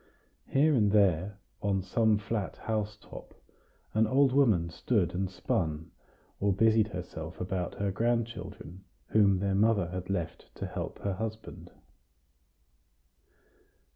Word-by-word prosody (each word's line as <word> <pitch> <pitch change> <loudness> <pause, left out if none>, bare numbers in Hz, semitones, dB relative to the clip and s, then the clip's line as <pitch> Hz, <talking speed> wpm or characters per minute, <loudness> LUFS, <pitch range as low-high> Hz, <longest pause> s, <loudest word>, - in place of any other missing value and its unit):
Here 150 +3 +3
and 105 -6 +3
there, 100 -1 +2 0.2
on 100 -2 0
some 110 +2 +2
flat 105 -1 -3
housetop, 105 -2 -5 0.6
an 110 0 +3
old 135 +3 +4
woman 105 -12 +3
stood 100 0 0
and 95 +1 -1
spun, 80 -3 -2 0.5
or 100 0 +2
busied 110 +2 +4
herself 90 -4 -7
about 90 -1 -3
her 100 -1 -1
grandchildren, 115 -4 -3 0.3
whom 100 -3 +4
their 100 +1 0
mother 100 -3 +3
had 90 +1 -5
left 85 -2 -4
to - - -5
help 90 -2 -5
her 100 - 0
husband. 110 +3 -6
100 Hz, 120 wpm, -30 LUFS, 90-110 Hz, 0.6 s, old